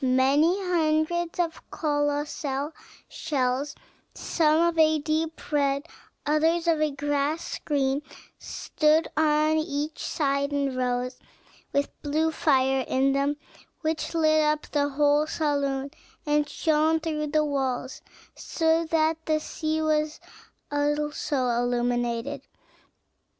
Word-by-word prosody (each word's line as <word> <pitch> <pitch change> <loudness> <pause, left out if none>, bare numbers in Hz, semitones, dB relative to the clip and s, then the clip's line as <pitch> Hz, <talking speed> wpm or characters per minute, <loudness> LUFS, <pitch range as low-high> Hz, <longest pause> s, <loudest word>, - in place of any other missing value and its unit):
May 260 +2 +3
hundreds 345 -1 +1
of 335 -2 -1
colossal 290 -1 -1 0.4
shells, 275 -1 -1 0.4
some 310 -1 +2
of 340 - -4
a 315 0 +5
deep 315 +2 -3
red, 280 0 +1 0.4
others 320 +3 +2
of 320 -2 +3
a 310 - +3
grass 290 +2 -2
green, 275 -1 0 0.4
stood 310 +1 +1
on 310 0 +3
each 305 -1 -2
side 280 -1 0
in 280 -2 -1
rows, 250 0 -1 0.5
with 280 0 0
blue 310 +2 0
fire 265 -4 +2
in 270 +1 +2
them, 280 +1 0 0.4
which 315 +1 -2
lighted 310 -1 +4
up 300 0 -1
the 285 -1 +1
whole 290 +2 +2
saloon, 280 -3 -1 0.3
and 295 -1 +1
shone 315 0 +2
through 310 -2 -2
the 305 +1 +2
walls, 265 -2 -2 0.3
so 325 0 +1
that 320 0 +1
the 310 -1 +2
sea 315 0 -2
was 305 0 0 0.5
also 290 -2 0
illuminated. 240 +2 -1
295 Hz, 115 wpm, -26 LUFS, 275-315 Hz, 0.5 s, a